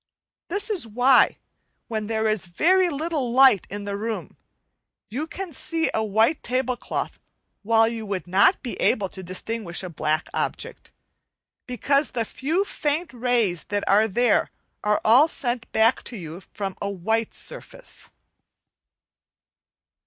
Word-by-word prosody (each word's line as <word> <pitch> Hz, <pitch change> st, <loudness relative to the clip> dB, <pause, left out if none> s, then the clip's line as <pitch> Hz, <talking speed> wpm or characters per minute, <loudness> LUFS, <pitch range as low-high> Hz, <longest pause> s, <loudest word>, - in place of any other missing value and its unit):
This 405 Hz, +4 st, -2 dB
is 365 Hz, -, +1 dB
why, 250 Hz, +4 st, +4 dB, 0.5 s
when 215 Hz, -2 st, -3 dB
there 220 Hz, 0 st, 0 dB
is 215 Hz, -4 st, -1 dB
very 360 Hz, -, +3 dB
little 300 Hz, -4 st, -2 dB
light 255 Hz, -6 st, +6 dB
in 205 Hz, +1 st, -5 dB
the 200 Hz, 0 st, -3 dB
room, 220 Hz, +2 st, -4 dB, 0.8 s
you 285 Hz, +8 st, -3 dB
can 375 Hz, -1 st, -6 dB
see 325 Hz, +4 st, -1 dB
a 220 Hz, -, +1 dB
white 220 Hz, +8 st, +2 dB
tablecloth 255 Hz, 0 st, -2 dB, 0.4 s
while 225 Hz, +1 st, +4 dB
you 225 Hz, -2 st, -4 dB
would 190 Hz, -5 st, -3 dB
not 195 Hz, -, +3 dB
be 245 Hz, -, -4 dB
able 195 Hz, -3 st, +1 dB
to 190 Hz, -, -8 dB
distinguish 185 Hz, +1 st, -3 dB
a 180 Hz, -, -6 dB
black 155 Hz, 0 st, -1 dB
object, -, -, -4 dB, 0.8 s
because 275 Hz, +3 st, +1 dB
the 230 Hz, -3 st, -2 dB
few 320 Hz, -, -1 dB
faint 305 Hz, -2 st, -2 dB
rays 235 Hz, -8 st, 0 dB
that 205 Hz, -1 st, -2 dB
are 210 Hz, +3 st, +5 dB
there, 235 Hz, +2 st, +2 dB, 0.3 s
are 210 Hz, 0 st, +2 dB
all 250 Hz, +8 st, +7 dB
sent 245 Hz, -7 st, -4 dB
back 225 Hz, +3 st, +3 dB
to 235 Hz, -, -5 dB
you 170 Hz, 0 st, -8 dB
from 195 Hz, -2 st, -4 dB
a 200 Hz, -, -1 dB
white 220 Hz, +4 st, -1 dB
surface. -, -, -7 dB
230 Hz, 140 wpm, -24 LUFS, 205-275 Hz, 0.8 s, all